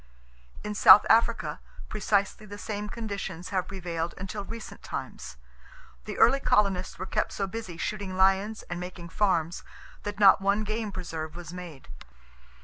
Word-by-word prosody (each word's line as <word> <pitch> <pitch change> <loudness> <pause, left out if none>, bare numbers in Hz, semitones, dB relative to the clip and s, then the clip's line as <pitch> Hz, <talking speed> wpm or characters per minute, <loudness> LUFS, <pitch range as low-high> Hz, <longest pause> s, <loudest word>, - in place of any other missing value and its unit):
In 210 - -3
South 210 - +9
Africa, 230 +1 +2 0.3
precisely 205 0 0
the 205 0 -8
same 210 0 -5
conditions 200 -6 -5
have 185 -2 -1
prevailed 170 -3 -4
until 195 +2 -5
recent 230 +2 -9
times. - - -7 0.7
The - - -6
early 445 - +5
colonists 195 -7 +1
were 185 - -4
kept - - -1
so 195 - -1
busy 195 -3 -6
shooting 195 +1 -4
lions 195 +3 +2
and 175 0 -6
making 180 -1 -8
farms 175 -4 0 0.4
that 205 0 -6
not 195 -1 +7
one 200 +2 +2
game 215 0 -3
preserve 160 -4 -6
was 175 0 -9
made. 175 -6 -9
195 Hz, 145 wpm, -28 LUFS, 180-210 Hz, 0.7 s, South